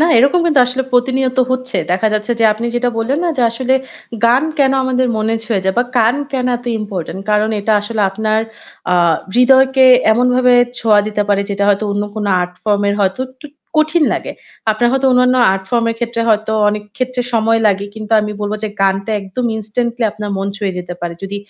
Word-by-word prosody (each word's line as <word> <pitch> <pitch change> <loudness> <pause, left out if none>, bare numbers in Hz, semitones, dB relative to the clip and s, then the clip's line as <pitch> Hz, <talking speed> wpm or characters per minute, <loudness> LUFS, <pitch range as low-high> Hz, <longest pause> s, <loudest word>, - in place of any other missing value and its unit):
না 320 - +4
এরকম 280 +8 +3
কিন্তু 300 -5 +3
আসলে 255 +1 -1
প্রতিনিয়ত 260 +1 +1
হচ্ছে। 255 0 -2 0.2
দেখা 220 +4 +1
যাচ্ছে 215 +2 -1
যে - - +3
আপনি 225 +2 -5
যেটা 245 0 0
বললেন 255 +6 -1
না? 345 - +1
যে 250 - +1
আসলে 255 +3 -1 0.5
গান 245 +4 +4 0.2
কেন 270 -1 +3
আমাদের 255 0 0
মনে 220 +1 0
ছুঁয়ে 210 -4 -1
যায় 190 - 0
বা 245 - +2
গান 225 +2 +3 0.2
কেন 255 -2 -1
এত 245 - -14 0.2
ইম্পরট্যান্ট 190 -3 -5
কারণ 210 +1 +2
এটা 215 +2 0
আসলে 215 +1 -4
আপনার 215 +2 -1 0.5
আ - - +4 0.4
হৃদয়কে 265 +1 +5 0.3
এমন 245 +3 +2
ভাবে 250 0 +3 0.3
ছোঁয়া 215 -2 +3
দিতে 210 -1 -1
পারে 200 -1 +2
যেটা 200 0 -1
হয়তো 205 +1 +2
অন্য 205 - -1
কোন 215 -1 -3 0.2
আর্ট 180 0 -3
ফর্ম 205 -1 +1
এর 200 - +1
হয়তো 195 +5 0
একটু 270 +3 -15 0.3
কঠিন 310 +1 +2
লাগে। - - -4 0.4
আপনার 240 +3 +1
হয়তো 270 0 +1
অন্যান্য 250 0 +3 0.2
আর্ট 190 0 -4
ফর্ম 235 -1 +1
এর 230 - -5
ক্ষেত্রে 235 -1 -2
হয়তো 220 0 +1 0.2
অনেক 210 0 -2
ক্ষেত্রে 255 -1 -2
সময় 225 0 +2
লাগে। 200 -1 0
কিন্তু 220 0 -6
আমি 210 0 -4
বলব 205 0 -3
যে - - -2
গানটা 195 +2 0
একদম 195 +6 -5
ইনস্ট্যান্টলি 235 +2 -2
আপনার 210 -1 -6
মন 195 0 -3
ছুঁয়ে 195 -3 -3
যেতে 180 0 -6
পারে। 175 -1 -4
যদি 195 +1 -5
225 Hz, 205 wpm, -15 LUFS, 205-255 Hz, 0.5 s, হৃদয়কে